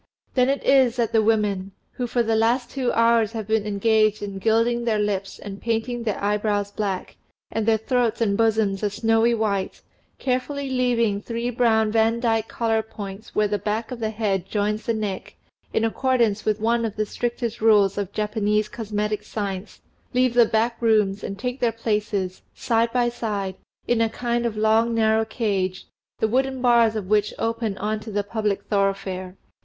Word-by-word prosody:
Then 255 0 +3
it 275 - 0
is 260 -3 +4
that 235 -3 0
the 225 - +4
women 205 -3 0 0.2
who 245 - -3
for 240 0 +1
the 225 0 +1
last 235 +3 +1
two 260 -3 -1
hours 230 -1 +3
have 220 -2 -4
been 220 0 0
engaged 215 +1 +2
in 200 -1 -5
gilding 230 +3 +2
their 225 -2 +1
lips 200 -2 -2
and 200 -1 -8
painting 235 +1 -1
their 220 -3 -2
eyebrows 205 0 0
black, 200 -3 -3 0.3
and 220 -1 -2
their 225 -1 +4
throats 235 0 0
and 210 -4 +1
bosoms 215 -3 +1
a 210 - +1
snowy 225 +2 +2
white, 200 -4 -2 0.4
carefully 265 +2 -2
leaving 235 -5 +1
three 235 +2 -3
brown 225 -3 +2
Van 225 +1 +2
dyke 225 -2 +1
collar 225 -1 0
points 205 -1 -9
where 210 0 +3
the 205 0 -1
back 215 +4 -2
of 250 - -5
the 220 -1 -1
head 205 -4 -1
joins 210 +1 -1
the 230 - +2
neck, 205 -3 -4 0.4
in 225 - +1
accordance 230 -3 +1
with 215 0 +1
one 230 +2 +1
of 220 -2 -3
the 215 - 0
strictest 235 +1 -3
rules 205 -3 +4
of 200 -2 -3
Japanese 210 0 0
cosmetic 210 -1 -3
science 200 -2 -5 0.3
leave 255 -1 +3
the 240 -2 +5
back 230 +2 0
rooms, 210 -4 +2
and 195 - -5
take 250 +4 -4
their 240 -2 +2
places, 210 -4 -2
side 230 -1 +1
by 245 -1 +2
side, 210 -5 -3 0.3
in 240 -1 +2
a 225 - +2
kind 240 0 -1
of 215 -2 -5
long 220 +2 +3
narrow 220 0 +3
cage, 195 -5 -2 0.3
the 220 - +1
wooden 265 +3 0
bars 235 -3 +4
of 210 -3 -3
which 210 +1 +1
open 225 -3 -2
on 215 +2 -2
to 215 - -9
the 205 -1 -1
public 205 -1 -2
thoroughfare. 195 -2 -2
220 Hz, 180 wpm, -23 LUFS, 205-235 Hz, 0.4 s, the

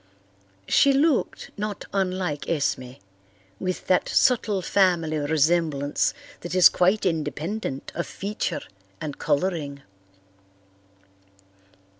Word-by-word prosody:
She 280 - +5
looked 285 0 +1
not 210 0 -4
unlike 185 -6 -1
Esme, 135 -5 -1 0.7
with 185 0 -3
that 185 - +2
subtle 215 -6 +2
family 170 -5 +2
resemblance 150 - +1 0.2
that 175 +1 -5
is 185 - +8
quite 190 +4 +2
independent 165 -1 -3
of 170 - -3
feature 205 +2 -3 0.4
and 145 -3 -6
colouring. 145 -3 -1
175 Hz, 90 wpm, -25 LUFS, 150-195 Hz, 0.7 s, is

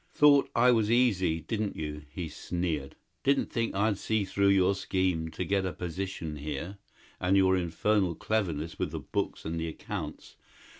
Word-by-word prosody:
"Thought 145 -1 +6
I 125 - +6
was 110 -3 +2
easy, 95 -9 +3
didn't 105 +5 -2
you?" 75 -1 -5
he 85 +2 -5
sneered. 80 -3 -3 0.3
"Didn't 140 0 +2
think 115 -3 -1
I'd 100 0 +1
see 110 -2 0
through 100 +1 +1
your 100 -1 +4
scheme 95 -4 0
to 80 +3 -4
get 95 +2 +1
a 95 - -1
position 90 -3 -4
here 75 +7 -5 0.4
and 90 +2 +3
your 95 -1 +5
infernal 90 +1 +1
cleverness 85 -8 -2
with - - 0
the - - -5
books - - -3
and 80 +1 -2
the 80 - -2
accounts? 80 - -6
95 Hz, 165 wpm, -29 LUFS, 80-105 Hz, 0.4 s, Thought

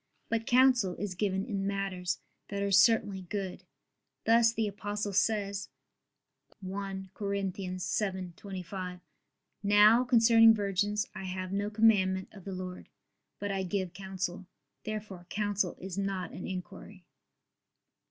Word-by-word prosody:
But 225 -1 -1
counsel 250 -7 +4
is 200 0 -4
given 190 +1 -1
in 195 -4 -2
matters 190 -3 -2 0.3
that 200 0 -3
are 200 - 0
certainly 200 -2 +4
good; 190 0 -5 0.6
thus 230 0 +5
the 225 -1 -1
Apostle 205 0 -3
says 200 -1 0 0.9
(1 190 0 -5
Cor. 205 -1 -4
7:25): 185 -1 -3 0.6
"Now 210 +4 +6
concerning 225 -2 +6
virgins 205 +1 0
I 190 - -6
have 185 0 -4
no 200 +1 0
commandment 200 -4 +3
of 195 -4 -13
the 195 - -5
Lord: 185 -1 -6 0.5
but 205 0 -3
I 195 -1 -1
give 185 -1 -2
counsel." 190 -1 -4 0.4
Therefore 205 -5 -6
counsel 205 -3 0
is 190 +1 -5
not 195 -2 -2
an - - -7
inquiry. 190 0 -8
195 Hz, 125 wpm, -31 LUFS, 185-210 Hz, 0.9 s, Now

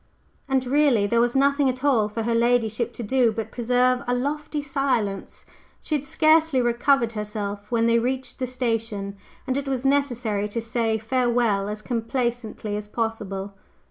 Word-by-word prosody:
And 265 -1 +1
really 265 -5 +3
there 230 +3 +2
was 240 +1 +1
nothing 280 0 +3
at 255 +1 -4
all 235 -7 +3
for 225 +2 -3
her 235 +1 0
ladyship 235 -1 +1
to 240 - -6
do 245 +1 +2
but 220 0 -5
preserve 250 +1 +2
a 245 - +1
lofty 295 +4 -2
silence. 270 -8 -2 0.3
She - - -5
had 290 -1 0
scarcely 310 -1 +3
recovered 240 0 +2
herself 210 -1 -5
when 230 -1 +2
they 230 0 +4
reached 255 +2 -3
the 255 - -1
station, 225 -5 -2 0.3
and 265 0 -1
it 280 0 -3
was 265 -1 -2
necessary 245 -7 +1
to 230 - -3
say 225 -1 0
farewell 230 -3 +1
as 210 0 -5
complacently 235 -3 -2
as 210 0 -5
possible. 205 -3 -3
240 Hz, 165 wpm, -24 LUFS, 220-265 Hz, 0.3 s, they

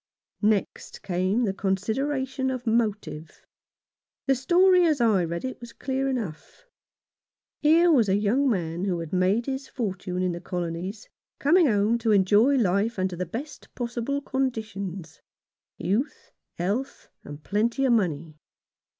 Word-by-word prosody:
Next 210 -2 -1
came 185 +6 0
the 200 -4 0
consideration 260 +8 -1
of 255 -1 -4
motive. 210 -9 -2 0.8
The 270 - +3
story 360 +7 +4
as 305 -4 +1
I 215 -6 +3
read 170 +6 -4
it 260 - -5
was 235 -1 -10
clear 270 +1 -2
enough. 240 - -5 1.0
Here 330 +3 +5
was 235 -9 +4
a 190 - +3
young 225 +7 +2
man 175 -4 -1
who 185 -3 0
had 165 0 -7
made 190 +6 +2
his 270 0 -4
fortune 190 -5 -3
in 180 - +1
the 175 0 -6
Colonies 180 +3 -4 0.3
coming 330 +3 +4
home 215 +1 +2
to 225 -1 +1
enjoy 205 +7 +4
life 210 -1 +1
under 185 -1 -1
the 180 0 -4
best 270 - -8
possible 245 +3 -2
conditions 215 - -4 0.3
— - - -68 0.2
youth, 210 - -2 0.3
health, 205 +10 -3 0.2
and 145 +1 -10
plenty 230 +6 0
of 255 - +4
money. 160 -7 -1
215 Hz, 140 wpm, -26 LUFS, 185-265 Hz, 1.0 s, Here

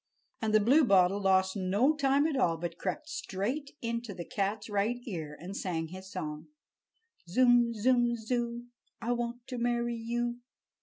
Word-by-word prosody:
And 220 -1 0
the 215 - +6
Bluebottle 205 - +4
lost 190 0 +3
no 205 +10 +2
time 280 0 +3
at 315 -3 0
all, 170 -11 +2
but 170 +1 -5
crept 300 - -3
straight 275 -1 -3
into 230 -3 -3
the 170 - -6
cat's 205 +2 -2
right 210 +3 0
ear 160 -8 -5
and 180 +5 -7
sang 165 -5 -2
his 190 +2 -9
song: 155 -4 -5 0.8
"Zum, 245 +3 +5
zum, 240 +1 +3
zoo, 235 +1 -2 0.3
I 235 - -2
want 240 0 -3
to 250 -2 -5
marry 240 0 0
you!" 240 +1 -2
230 Hz, 155 wpm, -30 LUFS, 190-245 Hz, 0.8 s, the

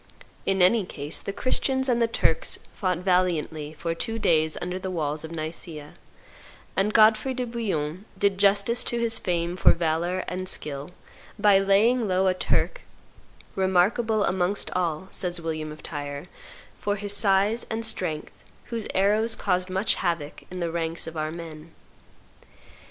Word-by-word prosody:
In 190 -1 +3
any 210 +4 +4
case, 150 -4 -5
the - - -4
Christians 265 +4 0
and 240 -2 +2
the 230 - +4
Turks - - +1 0.2
fought 185 -3 -1
valiantly 170 -4 0
for 165 +1 -2
two 225 +7 -2
days 160 -6 +2
under 180 +1 -4
the 190 - -4
walls 155 -4 -2
of 160 - -6
Niccea, 155 -2 -6 0.8
and 195 +2 +2
Godfrey 220 +4 +4
de 250 0 -2
Bouillon 195 -7 -3
did 200 -2 +1
justice 200 +4 +3
to 240 - +1
his 230 -1 +2
fame 175 -1 -1
for 185 - +5
valor 170 +2 -1
and 185 0 -3
skill 145 -3 -1 0.5
by 205 -2 +5
laying 215 +5 +3
low 185 0 +2
a 185 - +4
Turk - - 0 0.7
"remarkable 200 +4 +2
amongst 185 +2 0
all," 175 -1 -1
says 175 -1 -2
William 155 -2 -4
of 155 - -11
Tyre, 145 0 -5 0.5
"for 205 0 -1
his 205 0 +2
size 205 +3 +3
and 225 0 -2
strength, 160 -8 -3 0.3
whose 230 -2 -3
arrows 215 +4 +3
caused 185 -1 0
much 190 +3 +1
havoc 165 -5 -2
in 185 - -6
the 170 -1 -1
ranks 165 0 -2
of 165 0 -8
our 155 0 -2
men." 160 -1 -9
185 Hz, 155 wpm, -26 LUFS, 165-210 Hz, 0.8 s, for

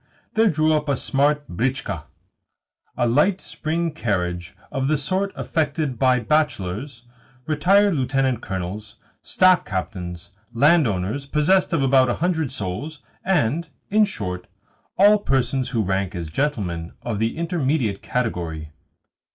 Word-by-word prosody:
there 220 0 +4
drew 155 -1 +2
up 150 -1 0
a 140 - +1
smart 145 +2 +1
britchka 120 - -2 0.9
a 120 -1 +2
light 150 +11 +3
spring 165 0 -2
carriage 90 - -2 0.2
of 135 0 -1
the 155 +1 +2
sort 185 +7 -1
affected 150 -5 -1
by 130 -1 +4
bachelors, 120 -3 -1 0.4
retired 190 +7 +3
lieutenant 130 -3 0
colonels, 95 +2 -5 0.3
staff 185 -1 +4
captains, 90 -2 -5 0.2
land 150 +4 +5
owners 105 +8 -2
possessed 160 +7 +2
of 165 -5 +1
about 130 -1 +4
a - - +1
hundred 160 -5 0
souls, 140 +12 -5 0.2
and, 170 -3 +1 0.2
in 215 +1 +5
short, 90 - -3 0.5
all 205 +2 +6
persons 130 - 0
who 115 -4 0
rank 95 0 -1
as 85 -3 -5
gentlemen 90 - -2
of 115 -4 -3
the 115 +5 -1
intermediate 150 - 0
category. 85 -10 -3
135 Hz, 130 wpm, -22 LUFS, 100-155 Hz, 0.9 s, all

